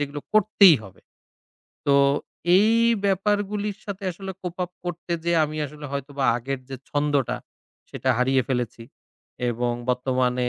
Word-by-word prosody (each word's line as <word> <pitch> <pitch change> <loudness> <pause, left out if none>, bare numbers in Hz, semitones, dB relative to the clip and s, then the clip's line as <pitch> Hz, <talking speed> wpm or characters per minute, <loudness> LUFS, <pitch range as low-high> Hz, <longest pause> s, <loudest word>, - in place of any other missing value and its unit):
যেগুলো 145 0 -3
করতেই 200 -5 +6
হবে। 95 - -14 0.9
তো 140 - +4 0.6
এই 215 +3 +5 0.3
ব্যাপারগুলির 205 +1 0
সাথে 200 -1 -6
আসলে 190 +2 -7
cope 180 0 -6
up 180 - -13
করতে 175 0 -4
যে 170 - +1
আমি 155 +1 -5
আসলে 150 +1 -9
হয়তো 140 0 -4
বা 135 - +1
আগের 130 +2 -4
যে 135 - -4
ছন্দটা 145 -3 +1 0.5
সেটা - - -1
হারিয়ে 130 +1 +3
ফেলেছি 120 -3 -2 0.7
এবং 120 +1 -1 0.2
বর্তমানে 125 0 +1
145 Hz, 135 wpm, -24 LUFS, 130-190 Hz, 0.9 s, করতেই